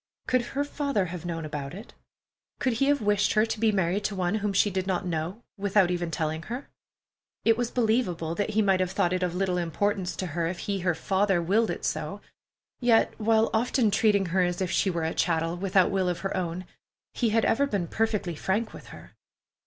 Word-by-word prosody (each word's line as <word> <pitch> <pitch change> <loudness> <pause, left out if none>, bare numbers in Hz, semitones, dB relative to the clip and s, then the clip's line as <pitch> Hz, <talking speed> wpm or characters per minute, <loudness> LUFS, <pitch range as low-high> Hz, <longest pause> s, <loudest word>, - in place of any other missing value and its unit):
Could 255 -1 +2 0.2
her 285 - +3
father 280 -8 -1
have 175 -1 -6
known 165 -2 -3
about 145 0 -5
it? 210 +5 -11 0.7
Could 255 - +1
he - - +5
have 285 -5 +2
wished 205 0 +2
her 215 0 +4
to 225 - -4
be 225 0 +3
married 190 0 0
to 205 - -1
one 180 0 0
whom 205 0 0
she 200 +1 +3
did 190 0 -2
not 185 0 -1
know, 175 +6 -3 0.2
without 200 -2 +3
even 175 -1 -1
telling 160 0 -2
her? 245 +9 -6 0.8
It 225 - +5
was 240 0 -1
believable 215 -10 0
that 205 +4 -1
he 215 0 +2
might 195 -2 +3
have 185 -1 +1
thought 175 0 +1
it 185 - -1
of 180 -1 -1
little 180 -1 0
importance 185 +2 -1
to 185 - -3
her, 170 0 0
if 175 +1 -3
he, 200 +1 -3
her 175 -2 0
father, 195 +1 +1
willed 200 +7 +2
it - - -4
so; - - -3 0.6
yet 240 -2 +3
while 220 +1 +3
often 230 0 +2
treating 205 -1 +3
her 190 - +3
as 175 -1 0
if 185 -2 -1
she 195 - +2
were 170 -3 -2
a 160 - -1
chattel, 165 0 0
without 185 0 +2
will 190 -2 +1
of 175 -1 -3
her 195 - -2
own, 180 0 -3 0.5
he 235 - +1
had 225 +1 +2
ever 280 +5 +2
been 200 -9 -1
perfectly 210 -2 -1
frank 210 +8 -1
with - - -11
her. - - -12
195 Hz, 215 wpm, -27 LUFS, 175-220 Hz, 0.8 s, he